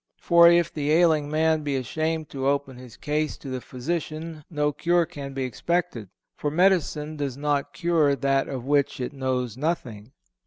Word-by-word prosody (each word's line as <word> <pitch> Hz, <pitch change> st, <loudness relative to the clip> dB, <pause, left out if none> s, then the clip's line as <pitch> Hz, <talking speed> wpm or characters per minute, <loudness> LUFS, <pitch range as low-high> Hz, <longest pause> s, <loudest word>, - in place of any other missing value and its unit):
For 170 Hz, -1 st, +6 dB
if 170 Hz, -1 st, +3 dB
the 150 Hz, -1 st, -1 dB
ailing 160 Hz, -3 st, +3 dB
man 160 Hz, +1 st, +2 dB
be 145 Hz, -2 st, -2 dB
ashamed 155 Hz, +4 st, -2 dB
to 135 Hz, -1 st, -2 dB
open 140 Hz, -2 st, 0 dB
his 125 Hz, -2 st, -12 dB
case 150 Hz, +1 st, -2 dB
to 140 Hz, -, -9 dB
the 130 Hz, -1 st, -4 dB
physician 155 Hz, +4 st, -5 dB
no 150 Hz, -3 st, 0 dB
cure 170 Hz, +3 st, +1 dB
can 140 Hz, -4 st, -8 dB
be 135 Hz, -, -2 dB
expected; 130 Hz, -, -2 dB, 0.3 s
for 145 Hz, -, -2 dB
medicine 155 Hz, -3 st, +1 dB
does 140 Hz, -3 st, -3 dB
not 145 Hz, -1 st, -1 dB
cure 150 Hz, -2 st, +2 dB
that 135 Hz, 0 st, 0 dB
of 130 Hz, -3 st, -5 dB
which 140 Hz, -1 st, +1 dB
it 125 Hz, +3 st, -4 dB
knows 130 Hz, -3 st, -2 dB
nothing." 130 Hz, -7 st, -3 dB
150 Hz, 170 wpm, -25 LUFS, 135-160 Hz, 0.3 s, For